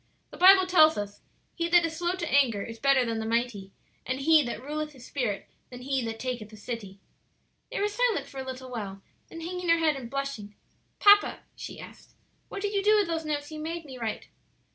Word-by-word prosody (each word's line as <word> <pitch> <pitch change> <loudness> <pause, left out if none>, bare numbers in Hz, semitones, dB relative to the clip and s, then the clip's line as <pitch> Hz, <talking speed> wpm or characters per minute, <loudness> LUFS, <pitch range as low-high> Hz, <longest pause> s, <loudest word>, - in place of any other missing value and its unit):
"The - - -11
Bible 375 +1 +8
tells 320 -4 +5
us, 205 0 -5 0.3
'He 335 0 -1
that 350 -1 +5
is 325 -1 -4
slow 350 +1 -1
to 360 -2 -4
anger 250 -7 +3
is 230 0 -8
better 275 0 +3
than 230 -1 -2
the 220 - -3
mighty; 230 -4 -1 0.3
and 255 +1 -3
he 310 +2 +5
that 240 -5 -4
ruleth 300 +3 -4
his 255 -3 -14
spirit 240 -8 -3 0.2
than 250 0 -10
he 270 -1 -1
that 225 0 -4
taketh 245 -4 -4
a 215 - -12
city.'" 205 -3 -7 0.7
They - - -3
were 410 - +2
silent 460 +1 0
for 270 - -9
a - - -3
little 260 0 -7
while, 200 -5 -6 0.2
then 330 - -9
hanging 360 +1 -4
her 335 - +6
head 315 -2 +2
and 250 -4 -7
blushing, 275 -7 -5 0.4
"Papa," 410 0 +5
she - - -8
asked, - - -13 0.3
"what 400 - -6
did 410 0 -1
you 400 - +1
do 425 +2 +5
with 415 - +3
those 325 -1 -2
notes 290 0 -3
you 310 - -6
made 330 +1 -5
me 260 -3 -10
write?" 225 -2 -4
275 Hz, 220 wpm, -28 LUFS, 235-335 Hz, 0.7 s, Bible